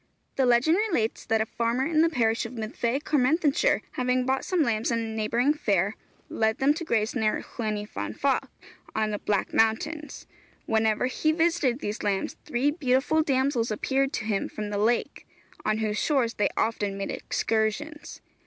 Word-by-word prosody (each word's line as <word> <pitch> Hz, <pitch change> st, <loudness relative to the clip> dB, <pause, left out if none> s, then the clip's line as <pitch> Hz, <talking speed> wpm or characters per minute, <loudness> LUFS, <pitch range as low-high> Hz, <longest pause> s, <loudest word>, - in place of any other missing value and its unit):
The 265 Hz, -2 st, +2 dB
legend 245 Hz, +8 st, +4 dB
relates 345 Hz, -, -1 dB
that 225 Hz, -1 st, +2 dB
a -, -, +1 dB
farmer 235 Hz, +3 st, -1 dB
in 315 Hz, 0 st, +2 dB
the 330 Hz, -, +4 dB
parish 230 Hz, -6 st, +1 dB
of 235 Hz, -, -11 dB
Myddfai, 235 Hz, +3 st, -2 dB
Carmarthenshire, 300 Hz, -, +2 dB
having 250 Hz, 0 st, 0 dB
bought 265 Hz, +1 st, 0 dB
some 360 Hz, -4 st, +1 dB
lambs 225 Hz, -4 st, 0 dB
in 235 Hz, -, +1 dB
a 230 Hz, -, -1 dB
neighbouring 235 Hz, +6 st, +2 dB
fair, 200 Hz, -, 0 dB, 0.3 s
led 220 Hz, 0 st, 0 dB
them 275 Hz, +2 st, +3 dB
to 335 Hz, -, -5 dB
graze 225 Hz, -7 st, 0 dB
near 220 Hz, -4 st, 0 dB
Llyn 215 Hz, -3 st, -3 dB
y 210 Hz, 0 st, -4 dB
Fan -, -, -5 dB
Fach, -, -, 0 dB, 0.5 s
on 215 Hz, 0 st, 0 dB
the 205 Hz, -, -3 dB
Black 205 Hz, -2 st, -1 dB
Mountains. 290 Hz, +7 st, 0 dB, 0.4 s
Whenever 220 Hz, +1 st, +1 dB
he 285 Hz, +5 st, +1 dB
visited 320 Hz, -6 st, +1 dB
these 210 Hz, +2 st, -3 dB
lambs 200 Hz, -2 st, -1 dB
three 285 Hz, -1 st, +1 dB
beautiful 285 Hz, +1 st, +2 dB
damsels 265 Hz, -5 st, +1 dB
appeared 270 Hz, +5 st, 0 dB
to 220 Hz, -, -3 dB
him 210 Hz, -3 st, -1 dB
from 210 Hz, -1 st, -5 dB
the 205 Hz, -, -1 dB
lake, 230 Hz, +3 st, 0 dB, 0.4 s
on 215 Hz, -, +1 dB
whose 215 Hz, -1 st, -1 dB
shores 265 Hz, -7 st, +1 dB
they 210 Hz, -, +1 dB
often 205 Hz, -3 st, 0 dB
made 195 Hz, -, -3 dB
excursions. 225 Hz, +8 st, -2 dB
240 Hz, 175 wpm, -26 LUFS, 220-285 Hz, 0.5 s, legend